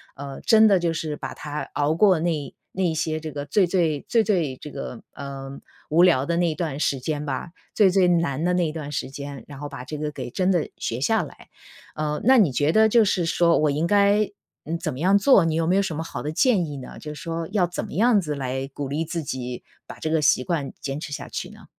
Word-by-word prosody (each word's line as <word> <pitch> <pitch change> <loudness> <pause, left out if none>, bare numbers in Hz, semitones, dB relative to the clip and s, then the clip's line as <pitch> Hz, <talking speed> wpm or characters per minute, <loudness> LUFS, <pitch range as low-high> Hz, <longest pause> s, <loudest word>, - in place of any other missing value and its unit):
呃， 140 -1 -7
真 220 -1 +6
的 200 - +5
就 170 -2 0
是 155 -1 -3
把 - - -6
它 150 0 -5
熬 145 +2 +1
过 185 -2 +4
那 160 -3 -2 0.2
那 180 -3 0
些 155 0 -1
这 155 -1 -6
个 145 -1 -5
最 190 +5 +3
最 165 -5 0
最 230 -2 +3
最 170 -10 0
这 150 - -9
个， 120 - -7
呃， 140 -1 -7 0.3
无 165 +3 +5
聊 150 -7 +4
的 170 0 0
那 170 -2 +2
段 155 -4 -3
时 140 -3 0
间 150 +1 -3
吧， 140 +4 -3 0.2
最 205 -3 +5
最 185 -1 +4
难 165 -5 +1
的 180 0 +2
那 175 -3 +1
段 155 -2 -6
时 135 - -3
间， 140 -3 -7
然 140 -2 -10
后 145 - -5
把 140 -4 -8
这 150 +4 -6
个 150 0 -3
给 145 - -6
真 185 +7 +1
的 175 -4 0
学 115 +3 -3
下 220 +8 +2
来。 - - -13 0.5
呃， 150 0 -2
那 260 +3 +6
你 185 - +5
觉 145 +5 +2
得 220 +2 +5
就 230 +1 +5
是 185 -4 +1
说 170 0 +3
我 155 - +2
应 155 +4 0
该 205 +2 +3 0.3
嗯， 165 +2 -3
怎 - - -3
么 130 - -8
样 190 +5 +4
做， 200 -3 +5
你 160 -1 0
有 165 0 0
没 180 - +3
有 200 - +4
什 170 -6 -3
么 160 - -2
好 165 - -6
的 150 - -2
建 200 - +3
议 145 -2 -6
呢？ 130 - -9
就 150 - -7
说 165 +1 -4
要 190 -5 +2
怎 175 - -4
么 - - -8
样 220 0 +4
子 150 -3 -3
来 130 0 -3
鼓 140 -2 -4
励 150 +4 -1
自 165 +1 -3
己 125 -4 -5 0.2
把 - - -11
这 155 - -2
个 160 -1 +2
习 135 - +4
惯 150 -6 -2
坚 135 0 -4
持 150 -1 -7
下 145 - -5
去 - - -5
呢？ - - -15
160 Hz, 265 characters per minute, -24 LUFS, 145-180 Hz, 0.5 s, 真